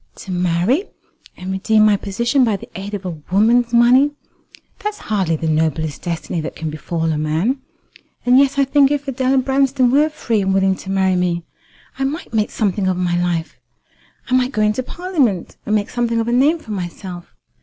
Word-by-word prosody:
To 195 - -9
marry, 180 - +1 0.5
and 185 +1 -5
redeem 215 +3 +3
my 210 -1 +5
position 235 +7 0
by 225 -4 +2
the - - -12
aid 200 +2 -5
of 195 -1 -7
a 170 -4 -5
woman's 230 +5 +3
money. 245 +4 +5 0.7
That's 420 0 -4
hardly 190 -6 -1
the 160 +1 -3
noblest 155 -1 0
destiny 170 -1 -3
that 155 - -6
can 160 -1 -4
befall 160 +1 -2
a 150 - -1
man. 160 - 0 0.7
And 250 +1 +6
yet 275 0 +2
I 275 - +4
think 275 0 +4
if 290 -1 -2
Adela 265 0 +1
Branston 265 -1 +2
were 295 +3 +4
free, 230 -8 -1
and 190 0 0
willing 190 0 +3
to 190 - -9
marry 190 -1 +2
me, 175 -1 0 0.6
I - - 0
might 295 -1 -5
make 215 -2 +1
something 200 -3 -1
of 185 -1 0
my 175 -1 0
life. 170 -2 -2 0.7
I 255 - -3
might 255 +1 +1
go 215 - +1
into 210 +4 +1
Parliament, 275 - -1
and 210 - +2
make 205 -1 -1
something 235 -1 0
of 225 - -1
a - - 0
name 280 +7 +3
for 225 - -11
myself. 180 -2 -6
210 Hz, 195 wpm, -19 LUFS, 180-255 Hz, 0.7 s, And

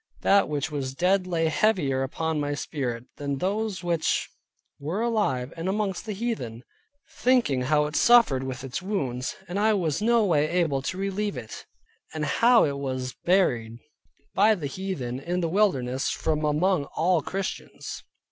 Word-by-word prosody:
That 200 -3 +4
which 150 0 -2
was 135 -3 -3
dead 185 +3 +2
lay 165 -2 0
heavier 160 -8 +1
upon 160 +4 -2
my 145 0 -1
spirit, 125 -5 -4
than 140 -1 -3
those 200 +3 -2
which 170 -2 0 0.5
were 160 +8 -3
alive 205 - 0
and 165 +2 -3
amongst 200 0 -2
the 215 - -2
heathen: 190 - -4 0.6
thinking 240 - +3
how 150 +3 +2
it 150 0 -5
suffered 235 - +5
with 130 -1 -5
its 135 +3 -4
wounds, 135 - -2
and 185 +2 -3
I 215 +1 +4
was 165 -3 -1
no 230 0 +3
way 155 -5 +2
able 165 -6 +1
to 185 +7 -4
relieve 195 -3 -2
it; 110 -3 -8 0.5
and 155 -1 -1
how 235 +5 +5
it 140 -2 -2
was 130 -2 -3
buried 120 -13 +1 0.6
by 215 +2 +5
the 165 -7 -6
heathen 140 -6 -4
in 175 +6 -2
the 170 - 0
wilderness 135 -10 +1
from 155 -1 -1
among 155 +1 +2
all 170 +3 +1
Christians. 195 +5 -5
160 Hz, 160 wpm, -26 LUFS, 135-195 Hz, 0.6 s, suffered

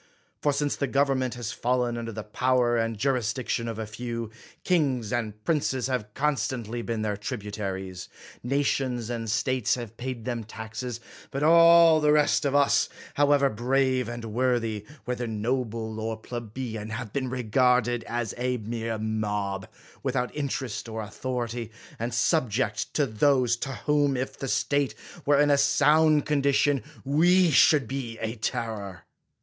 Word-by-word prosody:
For 145 - +3
since 145 0 0
the 140 - 0
government 135 -2 +1
has 120 -2 -4
fallen 125 0 0
under 115 -1 -4
the 110 0 -6
power 125 +2 +1
and 115 -1 0
jurisdiction 120 -1 -1
of 115 -2 -4
a 110 - -3
few, 115 +1 -5 0.3
kings 135 - +1
and 105 -3 -3
princes 140 -6 0
have 125 -5 -2
constantly 120 -5 -1
been 115 -2 -3
their 105 -1 -1
tributaries; 100 -4 -5 0.3
nations 125 -3 0
and 115 -2 -3
states 125 +2 +1
have 115 -3 -8
paid 125 -2 -5
them 120 -2 -2
taxes; 110 +2 -6 0.3
but 140 +1 -3
all 165 0 +7
the 150 0 +4
rest 150 0 +3
of 140 0 +1
us, 140 -1 +4 0.2
however 145 -1 +4
brave 130 +1 +1
and 120 -1 -6
worthy, 115 -2 -1 0.2
whether 125 -1 -2
noble 110 0 -2
or 110 0 -3
plebeian, 110 -1 -6
have 110 -1 -5
been 130 -2 -1
regarded 125 0 +2
as 120 -3 -3
a 125 0 0
mere 115 0 -3
mob, 105 -3 -2 0.3
without 125 -2 -1
interest 130 -5 -3
or 110 0 -4
authority, 120 +1 -4 0.3
and 115 +2 -2
subject 120 -4 0
to 145 - +3
those, 125 +1 +2
to 135 +3 -4
whom, 145 -2 +2
if 130 +1 -3
the 135 - -5
state 140 +1 0 0.3
were 145 -1 +5
in 145 0 +4
a 140 - +4
sound 150 +2 +4
con 150 -2 +1
dition, 140 0 +2 0.2
we 175 +5 +4
should 145 -2 +5
be 125 -3 -4
a 110 0 -3
terror. 105 -4 -4
120 Hz, 150 wpm, -27 LUFS, 110-135 Hz, 0.3 s, all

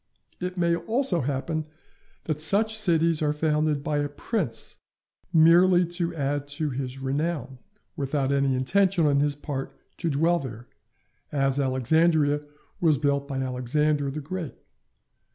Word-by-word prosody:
It 180 +1 -4
may 170 -1 +2
also 220 - +1
happen 145 +4 -2 0.6
that 155 -1 -1
such 215 +7 +3
cities 165 -6 +2
are 150 -1 +2
founded 150 -1 0
by 150 -1 -1
a 145 0 -1
prince 145 - -3 0.5
merely 175 +2 +5
to 175 -1 -2
add 145 -1 -2
to 155 -2 -1
his 130 0 -4
renown, 135 -1 -3 0.4
without 140 0 -1
any 140 -1 +2
intention 180 +6 +2
on 140 -1 +3
his 145 0 +1
part 140 -2 -6 0.2
to 170 - -2
dwell 165 +4 +2
there, 120 -4 -8 0.7
as 135 -1 +1
Alexandria 145 +3 +2 0.4
was 160 -4 +3
built 140 +1 0
by 135 -2 -4
Alexander 140 +3 0
the 150 +3 -5
Great. 165 0 -6
150 Hz, 135 wpm, -26 LUFS, 140-170 Hz, 0.7 s, merely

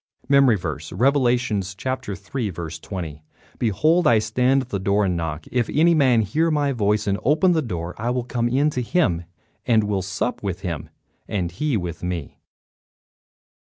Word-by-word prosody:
MEMORY 135 -4 +5
VERSE, 80 -3 -5
Revelations 120 -5 +1
3: 105 -1 -4
20 80 -1 -6 0.4
"Behold, 155 - +2
I 115 - +6
stand 125 +5 +2
at 125 - -15
the 100 - -2
door 100 +2 +2
and 90 -2 0
knock; 80 -2 -4
if 125 -2 0
any 165 +3 +4
man 130 -7 +4
hear 155 +11 +1
my 145 -2 +1
voice 105 -3 +1
and 100 -1 0
open 160 +6 +4
the 165 -2 +2
door, 90 - -4
I 115 +3 -1
will 125 0 0
come 120 -1 -1
in 140 +5 +2
to 125 - -2
him, 105 - +1 0.4
and 110 -3 +4
will 100 -2 -1
sup 95 +6 -3
with 95 -2 -4
him 80 -4 -4 0.4
and 90 -5 -2
he 140 - -1
with 85 -3 -5
me." 90 -4 -5
110 Hz, 165 wpm, -23 LUFS, 90-130 Hz, 0.4 s, I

